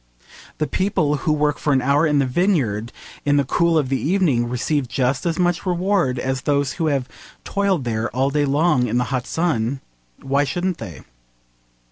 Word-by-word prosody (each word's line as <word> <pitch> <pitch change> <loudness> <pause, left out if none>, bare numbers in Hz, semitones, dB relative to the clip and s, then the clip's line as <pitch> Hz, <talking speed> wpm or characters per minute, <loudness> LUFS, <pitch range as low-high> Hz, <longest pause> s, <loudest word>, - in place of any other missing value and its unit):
The 155 - 0
people 160 -5 0
who 155 - -1
work 150 -1 +1
for 150 - +1
an 130 - +3
hour 145 +4 +3
in 150 -1 +2
the 140 - +3
vineyard 125 - 0 0.3
in 145 0 +2
the 140 - +3
cool 170 +5 +2
of 140 -4 0
the 135 - 0
evening 150 -9 +1
receive 130 +3 -1
just 130 +5 -1
as 165 - -1
much 175 -1 +1
reward 180 -7 0
as 130 +1 -2
those 140 -1 0
who 165 - -1
have 135 -4 0 0.4
toiled 195 -6 0
there 115 -1 -2
all 135 +2 0
day 145 0 +1
long 140 -3 +2
in 120 +2 -1
the 125 - +2
hot 125 -1 -2
sun. 140 -7 -1 0.4
Why 140 +1 +1
shouldn't 175 +5 -2
they? 90 - -8
145 Hz, 185 wpm, -21 LUFS, 125-165 Hz, 0.4 s, an